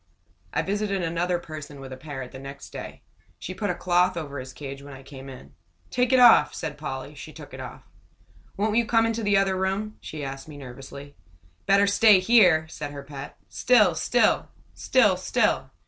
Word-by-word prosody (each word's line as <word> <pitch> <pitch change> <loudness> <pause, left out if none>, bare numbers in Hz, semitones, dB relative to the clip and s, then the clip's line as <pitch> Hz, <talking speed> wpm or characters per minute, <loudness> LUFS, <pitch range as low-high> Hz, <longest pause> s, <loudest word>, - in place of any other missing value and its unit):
I - - 0
visited 200 -1 -1
another 170 +2 0
person 155 -4 -9
with 135 -1 -8
a - - -6
parrot 135 -2 -8
the 130 - -9
next 140 +1 -10
day. - - -9 0.3
She 185 - -6
put 205 +2 -3
a 180 - 0
cloth 180 0 +2
over 145 -4 -5
his 130 0 -8
cage 135 +1 -8
when 140 -1 -10
I 135 - -13
came 135 -1 -11
in. 70 - -12 0.4
"Take 250 0 +1
it 260 - +5
off!" 245 -1 +7
said - - -5
Polly. - - -6
She - - -10
took - - -12
it - - -8
off. - - -9 0.7
"Won't 210 +2 0
you 235 -1 +2
come 225 -1 +3
into 230 0 -1
the 205 -2 +3
other 195 -1 +2
room?" 195 +3 -2
she 155 -2 -7
asked 135 +1 -7
me, 150 -2 -10
nervously. 135 +2 -10 0.5
"Better 200 +1 +5
stay 205 0 +6
here!" 185 -6 +5
said 150 -2 -6
her 140 -1 -8
pet. 140 0 -9
"Sit 215 -8 +3
still 225 +8 +2 0.3
sit - - +3
still!" - - +1
170 Hz, 195 wpm, -25 LUFS, 140-205 Hz, 0.7 s, off